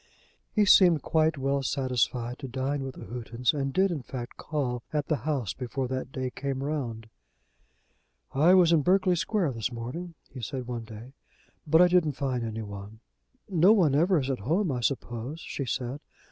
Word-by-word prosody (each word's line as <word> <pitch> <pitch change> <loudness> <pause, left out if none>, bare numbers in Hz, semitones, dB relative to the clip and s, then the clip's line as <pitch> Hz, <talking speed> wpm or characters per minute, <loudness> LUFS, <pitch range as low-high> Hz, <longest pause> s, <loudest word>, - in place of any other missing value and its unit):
He 210 -2 +3
seemed 175 -6 +6
quite 160 -1 +2
well 140 +1 0
satisfied 125 -2 -1
to 135 - -6
dine 135 +3 -2
with 135 -1 -6
the - - -9
Houghtons, 120 +3 -1
and 135 -2 -2
did, 190 +5 +2
in 155 -5 -3
fact, 125 -1 -7
call 130 -6 -3
at 150 -2 -2
the 155 - +2
house 130 - -1
before 130 +1 -3
that 130 0 -4
day 130 -1 -3
came 135 0 -3
round. 125 -7 -3 1.3
"I 160 +7 +5
was 175 -3 +6
in 165 -3 +5
Berkeley 185 +2 +3
Square 175 -2 0
this 115 0 -3
morning," 130 +9 -6
he 130 - -10
said 125 +3 -4
one 120 -2 -5
day, 115 +4 -11 0.5
"but 160 +3 +6
I - - +6
didn't 175 -4 +3
find 130 -3 -2
any 110 -1 -4
one." 100 +1 -9 0.5
"Nobody 180 -4 +4
ever 175 +5 +4
is 135 0 -1
at 130 - -3
home, 165 - 0
I 125 - -2
suppose," 125 +3 -3
she 140 - -5
said. 130 +2 -3
135 Hz, 180 wpm, -28 LUFS, 125-160 Hz, 1.3 s, seemed